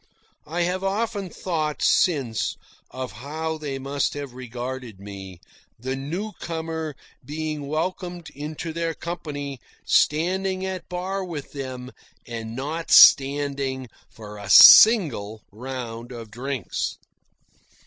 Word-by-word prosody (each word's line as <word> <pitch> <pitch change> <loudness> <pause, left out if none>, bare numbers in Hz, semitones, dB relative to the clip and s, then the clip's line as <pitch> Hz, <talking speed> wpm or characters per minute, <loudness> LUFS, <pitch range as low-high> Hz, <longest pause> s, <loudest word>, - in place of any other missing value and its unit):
I 170 +3 -2
have 180 +2 -1
often 200 0 -1
thought 155 -4 -3
since 135 -11 +2 0.3
of 130 -3 -6
how 155 +8 -5
they 140 -3 -4
must 140 +1 -2
have 140 -3 -6
regarded 125 -3 -7
me, 95 -3 -9 0.4
the 130 +3 -4
newcomer 160 -1 -4 0.3
being 155 -1 -4
welcomed 175 +1 -3
into 155 +3 -6
their 165 -1 -2
company 145 -5 -5 0.3
standing 185 +4 +1
at 190 -1 -5
bar 185 +2 -3
with 165 -6 -7
them, 130 -2 -6 0.3
and 115 -1 -6
not 155 +6 -4
standing 135 -2 +5 0.2
for 105 -1 -11
a 100 - -8
single 130 - +8
round 120 0 -7
of 115 -3 -9
drinks. 125 -2 -3
145 Hz, 110 wpm, -24 LUFS, 125-170 Hz, 0.4 s, single